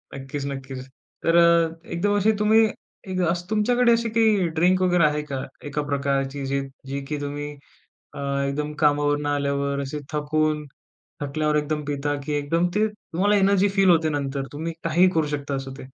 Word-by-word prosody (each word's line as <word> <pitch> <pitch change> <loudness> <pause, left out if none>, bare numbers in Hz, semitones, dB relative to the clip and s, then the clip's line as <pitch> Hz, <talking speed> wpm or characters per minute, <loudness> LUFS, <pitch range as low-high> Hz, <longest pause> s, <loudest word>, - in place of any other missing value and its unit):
नक्कीच, 135 +1 -5
नक्कीच. 135 -2 -6 0.4
तर 165 +1 +3
अ, 170 -1 +3
एकदम 205 +4 +1
अशी 215 +2 +3
तुम्ही 220 +1 +5 0.4
एक 185 0 -3
असं 175 +1 -2
तुमच्याकडे 235 +3 +3
अशी 230 0 +2
काही 215 -5 +3
ड्रिंक 185 +2 +3
वगैरे 180 -2 +3
आहे 150 0 +1
का? 135 -3 -4 0.2
एका 145 +1 -2
प्रकारची 140 0 -1
जी 140 +1 0 0.3
जी 140 +1 -3
की 150 - -2
तुम्ही 145 +1 -4 0.6
अ, - - -8 0.3
एकदम 150 +2 -3
कामावरनं 145 0 +2
आल्यावर 140 -1 0
असे 140 +2 -4
थकून 150 0 0 0.6
थकल्यावर 150 +2 0
एकदम 150 0 -1
पिता 145 0 -2
की 150 - -2
एकदम 155 +4 +1
ते 215 +1 +3
तुम्हाला 205 -1 -1
एनर्जी 200 0 +4
फील 195 -1 +3
होते 160 -2 +4
नंतर? 140 -2 -2
तुम्ही 160 +3 -4
काहीही 175 +3 +4
करू 160 -2 +2
शकता 140 0 -4
असं 135 0 -5
ते. - - -12
150 Hz, 170 wpm, -24 LUFS, 140-180 Hz, 0.6 s, तुम्ही